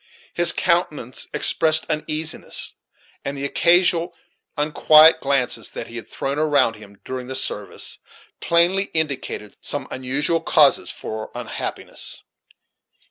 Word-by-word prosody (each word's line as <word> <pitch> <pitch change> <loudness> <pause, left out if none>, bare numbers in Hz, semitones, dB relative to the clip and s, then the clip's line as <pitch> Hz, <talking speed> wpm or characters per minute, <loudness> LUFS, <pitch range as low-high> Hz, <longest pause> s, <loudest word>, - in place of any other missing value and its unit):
His 175 -1 +6
countenance 165 -9 -1
expressed 160 -1 +2
uneasiness, 155 +1 -2 0.5
and 140 +1 -5
the 140 - -2
occasional 170 +2 +2 0.4
unquiet 155 +2 +5
glances 125 -4 0
that - - -7
he 120 - -8
had 115 - -8
thrown 140 +2 -4
around 140 -7 +2
him 100 -2 -15
during 130 -1 -6
the 130 - -4
service 105 -6 -2 0.4
plainly 175 +4 +2
indicated 140 -9 -3
some - - -3
unusual 140 +6 0
causes - - +3
for 110 0 -6
unhappiness. - - -5
150 Hz, 115 wpm, -21 LUFS, 130-165 Hz, 0.5 s, His